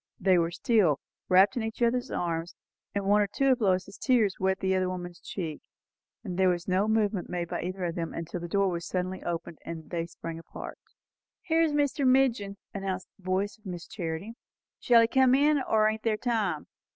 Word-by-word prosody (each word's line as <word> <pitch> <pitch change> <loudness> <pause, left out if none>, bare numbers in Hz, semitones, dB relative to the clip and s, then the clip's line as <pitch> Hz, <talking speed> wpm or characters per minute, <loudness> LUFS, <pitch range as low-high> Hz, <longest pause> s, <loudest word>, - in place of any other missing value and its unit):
They 185 -1 +4
were 165 0 +1
still, 175 - +2 0.3
wrapped 190 +2 +6
in 240 - -1
each 220 0 -4
other's 245 +1 +1
arms, 170 0 -2 0.4
and 200 -1 -1
one 205 +1 +4
or 205 - +2
two 270 +7 +2
of 255 -2 +1
Lois's 190 -1 0
tears 230 -7 +2
wet 190 0 +1
the 190 0 +1
other 185 -1 +1
woman's 175 -1 -6
cheek; 165 -6 -5 0.6
and 185 -4 -5
there 190 -1 +5
was 175 -1 -1
no 190 +3 +2
movement 215 -4 +1
made 175 -1 -2
by - - -3
either 185 +1 -3
of 170 - -2
them; 165 -1 -3
until 170 +1 -5
the 170 - -5
door 200 +3 +2
was 170 -1 -3
suddenly 185 0 -2
opened 170 -1 -4
and 165 -1 -8
they 170 -1 -2
sprang 165 -1 -7
apart. 165 - -9 0.6
"Here's 325 -2 +2
Mr. 290 -1 +1
Midgin," 255 -6 +3 0.2
announced 190 -2 -4
the 195 - -24
voice 195 +3 -1
of 215 - -13
Miss 175 -2 -6
Charity. 175 +3 -5 0.5
"Shall 235 -2 +6
he 230 - +4
come 260 +1 +4
in? 290 +1 +4
or 215 -4 +3
ain't 220 0 -1
there 220 -2 +1
time? 210 -10 -1
190 Hz, 200 wpm, -28 LUFS, 175-225 Hz, 0.6 s, wrapped